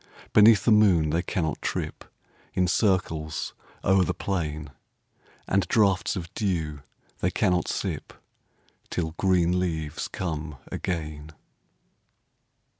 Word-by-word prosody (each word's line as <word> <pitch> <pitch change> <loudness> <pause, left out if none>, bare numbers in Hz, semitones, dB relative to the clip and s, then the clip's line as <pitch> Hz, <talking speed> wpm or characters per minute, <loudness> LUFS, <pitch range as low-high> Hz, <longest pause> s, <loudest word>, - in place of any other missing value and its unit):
Beneath 105 -1 +7
the 115 - +5
moon 95 -8 +5
they 85 +2 +1
cannot 85 -3 -2
trip - - -3 0.5
In 90 -1 +2
circles 85 -6 0 0.3
o'er 95 -1 +4
the - - -1
plain; 80 -6 -3 0.8
And 95 -2 +1
draughts 100 -1 +2
of 90 -2 -6
dew 80 -9 -2 0.4
they - - +1
cannot 90 -2 +1
sip, - - -3 0.8
Till 80 -3 -2
green 90 -2 +3
leaves 80 -4 -2
come 80 -4 -4 0.2
again. 75 -3 -4
90 Hz, 110 wpm, -26 LUFS, 80-95 Hz, 0.8 s, Beneath